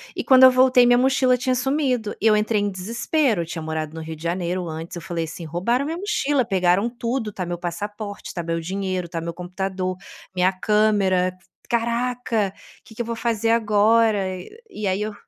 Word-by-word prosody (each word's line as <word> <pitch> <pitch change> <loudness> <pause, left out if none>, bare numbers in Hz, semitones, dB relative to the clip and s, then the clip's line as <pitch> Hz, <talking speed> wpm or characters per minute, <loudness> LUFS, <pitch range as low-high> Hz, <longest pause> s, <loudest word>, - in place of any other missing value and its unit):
E, - - -3
quando 260 -1 +6
eu 260 - +10
voltei, 255 -1 +5
minha 245 0 +5
mochila 255 0 +3
tinha 255 +1 0
sumido, 255 -4 0
e 225 - +3
eu 215 - +5
entrei 210 0 +1
em 205 -1 -1
desespero. 230 - 0
Eu 165 - -3
tinha 165 0 -6
morado 155 0 -4
no 160 - -6
Rio 160 0 -6
de 155 - -13
Janeiro 175 +1 -2
antes. 160 +2 -6
Eu 170 - -6
falei 170 -2 -3
assim: 160 +1 -8
"Roubaram 235 - 0
minha 320 +3 -3
mochila, 290 - 0
pegaram 190 +2 +2
tudo, 235 -2 -3
tá 180 - -4
meu 175 0 -4
passaporte, 205 +4 -6
tá 175 - -4
meu 165 0 -2
dinheiro, 185 0 -3
tá 170 - -4
meu 170 0 -4
computador, 185 +1 -4 0.4
minha 185 +1 +3
câmera. 195 -3 +2 0.3
Caraca, 235 -3 0 0.3
que 220 - -15
que 240 - -3
eu - - -2
vou 230 0 -3
fazer 225 -1 -1
agora?". 220 0 +3 0.5
E 210 - -4
aí 190 +2 0
eu 215 0 -3
205 Hz, 195 wpm, -22 LUFS, 180-240 Hz, 0.5 s, eu